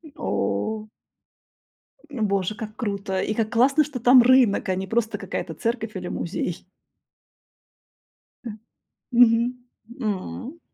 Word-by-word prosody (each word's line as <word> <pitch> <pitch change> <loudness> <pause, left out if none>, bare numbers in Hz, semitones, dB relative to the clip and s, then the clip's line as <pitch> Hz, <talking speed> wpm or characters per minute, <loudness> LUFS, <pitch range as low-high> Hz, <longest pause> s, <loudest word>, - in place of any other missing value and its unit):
О 155 - -2 1.2
Боже, 210 -6 -1
как 215 0 -7
круто 200 -4 -2
и 215 - -1
как 220 -1 -1
классно, 275 +6 +4
что 285 -3 -6
там 245 +1 +7
рынок, 250 -6 +4
а 185 - +2
не 190 +1 -4
просто 225 +1 -1
какая-то - - -5
церковь 230 -3 -3
или 180 -1 -5
музей. 175 -1 -4 1.8
М. 215 -2 -7 0.5
Мгм. 245 +1 +3 0.4
М. 230 - -4
220 Hz, 110 wpm, -24 LUFS, 200-245 Hz, 1.8 s, там